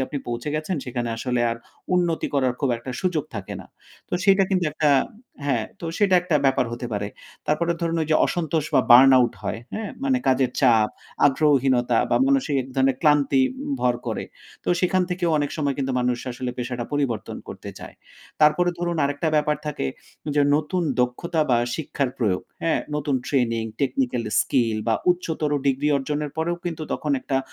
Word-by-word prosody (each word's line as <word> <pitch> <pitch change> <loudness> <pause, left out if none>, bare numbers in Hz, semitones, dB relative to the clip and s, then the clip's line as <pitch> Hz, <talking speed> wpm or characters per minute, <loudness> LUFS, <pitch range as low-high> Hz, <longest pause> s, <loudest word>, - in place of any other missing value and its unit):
আপনি 145 - -4
পৌঁছে 120 +4 -3
গেছেন 155 +4 -2
সেখানে 120 -1 -3
আসলে 125 +1 -1
আর 115 - -3 0.4
উন্নতি 175 -2 +1
করার 130 -3 +2
খুব 140 -3 +1
একটা 115 +3 -7
সুযোগ 180 -6 0
থাকে 100 -3 -5
না। - - -13 0.4
তো - - -2
সেটা 195 0 +6
কিন্তু 185 -2 +2
একটা 150 -1 +2 0.6
হ্যাঁ, 120 -6 +1 0.2
তো 170 - -5
সেটা 200 -3 +4
একটা 175 -4 +1
ব্যাপার 130 -2 +2
হতে 120 +1 -4
পারে। 100 0 -2 0.4
তারপরে 170 +3 +1
ধরুন 165 -1 0
ওইযে 155 0 +2
অসন্তোষ 160 -3 -1
বা - - +6
burn 130 +3 +9
out 120 -2 +2
হয় 115 - -3
হ্যাঁ 220 -1 -4
মানে 265 -2 +2
কাজের 130 -1 +3
চাপ, 115 -5 +4 0.4
আগ্রহহীনতা 135 -4 +3
বা - - +3
মানসিক 270 - +2
এক 130 - -12
ধরনের 135 -1 +3
ক্লান্তি 145 -3 +4 0.2
উ - - -7
ভর 125 -1 +2
করে। - - -2 0.4
তো - - -4
সেখান 185 0 +2
থেকেও 175 -1 0
অনেক 145 -1 -1
সময় 140 -2 0
কিন্তু 135 -1 -1
মানুষ 125 0 0
আসলে 125 +1 -4
পেশাটা 120 -1 -3
পরিবর্তন 140 -6 -2
করতে - - -8
চায়। - - -10 0.5
তারপরে 150 +4 +4
ধরুন 175 -1 -1
আরেকটা 145 +3 -1
ব্যাপার 150 0 +2
থাকে, 150 - -2 0.5
যে 145 - +5
নতুন 165 +4 -1 0.2
দক্ষতা 155 +7 -1
বা 120 - +4 0.2
শিক্ষার 140 -4 -2
প্রয়োগ। 100 -6 0 0.2
হ্যাঁ? 165 - +1 0.2
নতুন 145 -1 -1
ট্রেনিং, 115 -5 0 0.2
technical 125 -3 0 0.2
skill 115 -4 +1
বা 115 - +3 0.2
উচ্চতর 160 -4 -1 0.2
ডিগ্রি 140 +2 +1
অর্জনের 145 +2 -2
পরেও 170 +2 0
কিন্তু 165 -2 -4
তখন 150 - -3
একটা 135 +1 -1
140 Hz, 175 wpm, -23 LUFS, 125-165 Hz, 0.6 s, burn